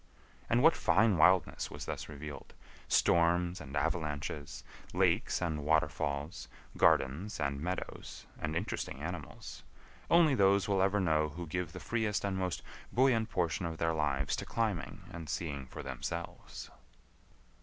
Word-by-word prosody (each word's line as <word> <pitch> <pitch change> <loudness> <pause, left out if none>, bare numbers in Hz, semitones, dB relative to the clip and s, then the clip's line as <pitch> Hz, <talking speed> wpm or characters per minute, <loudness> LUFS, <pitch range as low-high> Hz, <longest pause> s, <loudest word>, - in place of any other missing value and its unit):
And - - +3
what - - +7
fine 100 0 +3
wildness 90 +2 +4
was - - -7
thus - - -5
revealed—storms 85 +4 0
and 70 -1 -8
avalanches, 75 -1 -2 0.3
lakes 95 +2 +2
and 80 -4 -2
waterfalls, 75 +2 0 0.3
gardens 75 +11 +2
and 70 -1 -1
meadows, 90 +3 -5
and 80 0 -3
interesting 70 -5 -3
animals—only 90 - -1
those 100 -3 +4
will 100 -2 +2
ever 100 +2 +3
know 80 -4 +2
who 85 +4 -6
give 85 +1 -3
the 90 - -8
freest 110 -3 -1
and 100 -1 -1
most 95 -2 -2 0.3
buoyant 120 -3 +3
portion 85 -3 0
of 80 -1 -5
their 80 0 +1
lives 70 -3 0
to - - -3
climbing 110 -8 -2
and 80 -3 -7
seeing 70 -3 -3
for - - -8
themselves. 70 +6 -6
85 Hz, 135 wpm, -32 LUFS, 75-95 Hz, 0.3 s, what